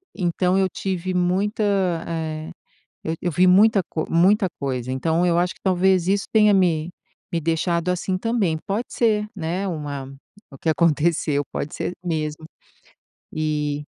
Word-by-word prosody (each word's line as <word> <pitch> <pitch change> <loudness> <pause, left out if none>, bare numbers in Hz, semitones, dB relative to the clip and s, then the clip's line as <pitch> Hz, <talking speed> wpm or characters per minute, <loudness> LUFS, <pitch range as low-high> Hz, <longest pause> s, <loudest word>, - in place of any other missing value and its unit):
então, 180 0 +1
eu 190 -1 +3
tive 185 -1 -3
muita 185 +4 0 0.4
eh, 160 -1 -4 0.5
eu 160 - -1
eu 180 - 0
vi 180 +4 +3
muita 200 +3 +6
co 160 - -3
muita 190 +5 +4
coisa. 130 -3 -3
Então, 160 +6 0
eu 170 -1 +2
acho 180 +1 0
que - - -26
talvez 185 -1 +2
isso 200 +1 +2
tenha 210 -1 +5
me 170 -4 +2 0.4
me 170 - 0
deixado 165 +2 0
assim, 180 +1 -1
também. 205 -5 0
Pode 215 +4 -2
ser, 215 -3 +1
né, 180 +1 -3
uma 145 -5 -4 0.4
o 135 - -13
que 165 - -4
aconteceu 155 -1 +2
pode 145 - -4
ser - - -3
mesmo. 155 -2 -3 0.9
E 150 -1 -2
170 Hz, 150 wpm, -22 LUFS, 155-190 Hz, 0.9 s, muita